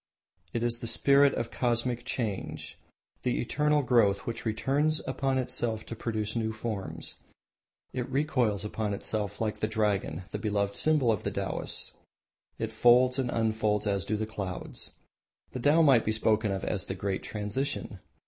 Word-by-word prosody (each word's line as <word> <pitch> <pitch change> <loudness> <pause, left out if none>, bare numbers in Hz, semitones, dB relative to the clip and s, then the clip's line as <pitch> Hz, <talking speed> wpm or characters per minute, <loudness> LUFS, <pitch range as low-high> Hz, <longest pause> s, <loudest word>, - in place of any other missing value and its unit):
It 115 - -2
is 120 0 0
the 115 - -4
spirit 140 +4 +5
of 115 0 -3
Cosmic 120 0 0
Change, 115 -5 -3 0.5
the 125 - 0
eternal 150 +4 +2
growth 110 -6 +3
which 115 0 -4
returns 145 +8 +1
upon 135 -1 0
itself 120 -3 -2
to 115 - -6
produce 110 -1 -3
new 110 -1 0
forms. 110 -3 -5 0.8
It 125 -2 -3
recoils 125 -8 +1
upon 105 -1 -2
itself 105 0 -3
like 110 -2 -1
the 110 - +1
dragon, 105 -6 0
the 105 - -3
beloved 100 -1 0
symbol 150 -7 +3
of 105 - -1
the - - -2
Taoists. - - -2 0.7
It 110 -1 -3
folds 125 +3 +5
and 125 -2 0
unfolds 110 -2 +1
as 100 -3 +1
do 105 +5 -1
the 110 - -1
clouds. 100 -4 -6 0.6
The 130 - -5
Tao 150 +6 +5
might 135 -6 +6
be 110 - 0
spoken 110 -1 +2
of 95 0 -3
as 100 -3 -1
the 95 - -3
Great 95 0 -2
Transition. 105 +6 -3
110 Hz, 160 wpm, -29 LUFS, 105-125 Hz, 0.8 s, might